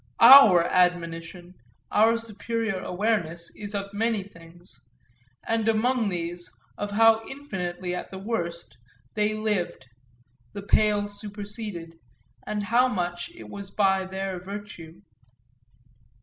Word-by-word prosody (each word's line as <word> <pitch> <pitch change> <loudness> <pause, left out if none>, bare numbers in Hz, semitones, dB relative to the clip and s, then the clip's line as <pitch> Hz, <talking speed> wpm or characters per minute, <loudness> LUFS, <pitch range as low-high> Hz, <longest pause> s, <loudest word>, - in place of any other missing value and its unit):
Our 230 -8 +9
admonition, 175 0 -1 0.4
our 225 +2 +4
superior 225 -2 -3
awareness, 180 -4 -2
is 205 0 -7
of 200 0 -4
many 220 -1 0
things 175 -1 -14 0.7
and, 225 -1 0
among 225 0 +2
these, 175 -1 -4 0.3
of 205 - -4
how 225 +2 +5
infinitely, 185 -10 -5
at 180 - -5
the 190 - -8
worst, 170 - -4 0.3
they 210 0 0
lived, 210 -9 -2 0.7
the 200 -1 -7
pale 205 0 +2
superseded, 205 -5 -7 0.5
and 210 -1 -2
how 240 +5 +3
much 175 -6 -3
it - - -11
was 200 -1 -8
by 190 -2 +1
their 190 -1 -4
virtue. 190 -4 -9
200 Hz, 115 wpm, -26 LUFS, 175-220 Hz, 0.7 s, Our